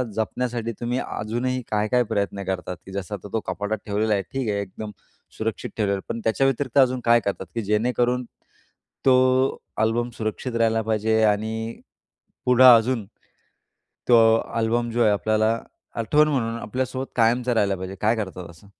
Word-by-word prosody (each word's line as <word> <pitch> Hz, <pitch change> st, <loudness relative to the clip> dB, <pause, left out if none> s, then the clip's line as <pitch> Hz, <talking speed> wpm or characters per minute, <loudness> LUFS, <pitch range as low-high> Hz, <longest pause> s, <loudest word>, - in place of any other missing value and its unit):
जपण्यासाठी 115 Hz, +1 st, -2 dB
तुम्ही 120 Hz, +2 st, -1 dB
अजूनही 125 Hz, +4 st, -2 dB
काय-काय 110 Hz, +4 st, +2 dB
प्रयत्न 100 Hz, 0 st, -1 dB
करतात? 90 Hz, -1 st, -4 dB
की 95 Hz, -, -10 dB
जसं 100 Hz, +1 st, -4 dB
आता 100 Hz, -, -9 dB
तो 110 Hz, -, +1 dB
कपाटात 105 Hz, +2 st, -2 dB
ठेवलेला 105 Hz, +1 st, 0 dB
आहे, 100 Hz, -, +1 dB
ठीक 130 Hz, -5 st, -2 dB
आहे. 100 Hz, -1 st, 0 dB
एकदम 105 Hz, +2 st, -7 dB, 0.5 s
सुरक्षित 110 Hz, -1 st, -3 dB
ठेवलेला 100 Hz, -3 st, +1 dB
आहे. -, -, -10 dB
पण -, -, -5 dB
त्याच्या 115 Hz, +4 st, +2 dB
व्यतिरिक्त 135 Hz, 0 st, -1 dB
अजून 130 Hz, -1 st, +4 dB
काय 120 Hz, 0 st, +6 dB
करतात? 100 Hz, -1 st, -2 dB
की 115 Hz, -, -1 dB
जेणेकरून 120 Hz, +4 st, +1 dB, 0.8 s
तो 130 Hz, -, +6 dB, 0.7 s
अल्बम 120 Hz, +2 st, 0 dB
सुरक्षित 115 Hz, +3 st, -3 dB
राहिला 115 Hz, -1 st, +2 dB
पाहिजे, 110 Hz, 0 st, +1 dB
आणि 110 Hz, +2 st, -1 dB, 0.7 s
पुढं 125 Hz, 0 st, +6 dB
अजून 115 Hz, -1 st, +1 dB, 1.0 s
तो 120 Hz, -2 st, +7 dB, 0.4 s
अल्बम 115 Hz, +1 st, 0 dB
जो 120 Hz, +1 st, +1 dB
आहे, 110 Hz, -, +5 dB
आपल्याला 110 Hz, +2 st, +1 dB, 0.4 s
आठवण 150 Hz, +7 st, +3 dB
म्हणून 115 Hz, -6 st, -1 dB
आपल्यासोबत 130 Hz, +3 st, -3 dB
कायमचा 120 Hz, +1 st, +2 dB
राहायला 100 Hz, -3 st, +1 dB
पाहिजे. 95 Hz, +1 st, -6 dB
काय 110 Hz, +2 st, +2 dB
करतात 95 Hz, -5 st, -5 dB
असं? 85 Hz, +4 st, -17 dB
110 Hz, 155 wpm, -23 LUFS, 105-120 Hz, 1.0 s, तो